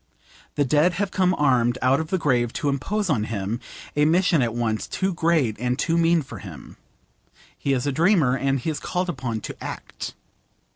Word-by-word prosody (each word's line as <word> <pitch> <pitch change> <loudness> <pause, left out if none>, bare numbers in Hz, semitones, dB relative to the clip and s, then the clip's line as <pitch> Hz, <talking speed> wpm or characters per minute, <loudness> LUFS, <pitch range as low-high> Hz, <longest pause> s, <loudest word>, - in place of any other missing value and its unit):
The 145 - +2
dead 150 +6 +3
have 195 +1 -2
come 185 -1 +2
armed 125 -4 +2
out 130 +2 +4
of 160 - -3
the 190 - 0
grave 125 -8 +1
to 150 -4 -1
impose 200 +9 -1
on 125 -10 +1
him 110 +1 -3 0.4
a 150 - +3
mission 170 -1 +3
at 115 -2 0
once 110 -2 -1
too 190 0 -1
great 160 -9 +1
and 125 +1 0
too 165 +3 0
mean 170 -1 +3
for 115 -6 -9
him. 90 -9 -11 0.8
He 140 - -1
is 125 0 0
a 145 - +1
dreamer, 160 -4 +3
and 135 0 0
he 160 - -2
is 150 - -4
called 180 0 -2
upon 125 -7 -3
to - - -8
act. - - -7
140 Hz, 195 wpm, -24 LUFS, 120-170 Hz, 0.8 s, out